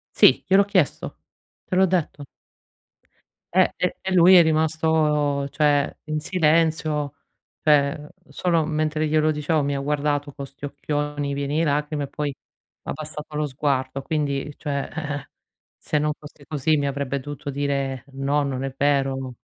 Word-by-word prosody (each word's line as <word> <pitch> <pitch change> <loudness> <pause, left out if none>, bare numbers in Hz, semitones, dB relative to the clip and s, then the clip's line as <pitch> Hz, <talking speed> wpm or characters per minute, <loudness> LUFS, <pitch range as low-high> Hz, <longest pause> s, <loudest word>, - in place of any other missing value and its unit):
Sì, - - +6
gliel'ho 195 +2 +5
chiesto, 185 -7 0 0.5
te 185 - -3
l'ho 190 - +5
detto. 165 -5 -1 1.3
Ehm, 185 0 +5
e 180 - -1
e 190 - -2
lui 180 +1 +7
è 175 - +9
rimasto 155 -3 +1
cioè 145 0 +2
in 155 0 -2
silenzio, 155 -3 +1 0.5
cioè 150 0 +3 0.2
solo 165 +3 +1
mentre 155 0 0
glielo 155 0 +3
dicevo 150 0 0
mi 140 0 -1
ha 140 - -2
guardato 145 0 -1
con 140 - -7
sti 135 +1 -14
occhioni 145 0 -3
pieni 140 +1 -2
di 165 - +3
lacrime 150 -1 0
e - - -7
poi 145 0 -3 0.5
ha - - -5
abbassato 150 -1 -7
lo 150 0 0
sguardo. 135 -1 -1
Quindi, 145 -1 -2
cioè 140 -2 -3
eh-eh, 145 -3 -4 0.5
se 150 - -1
non 150 0 +1
fosse 150 -1 -14
così 155 +1 +1
mi 145 - 0
avrebbe 140 -1 -2
dovuto 145 +1 -7
dire: 140 -2 -2
"No, 140 +2 0
non 135 -2 -3
è 135 -1 -4
vero, 140 -1 +2
n" 130 -1 -5
150 Hz, 155 wpm, -23 LUFS, 140-155 Hz, 1.3 s, è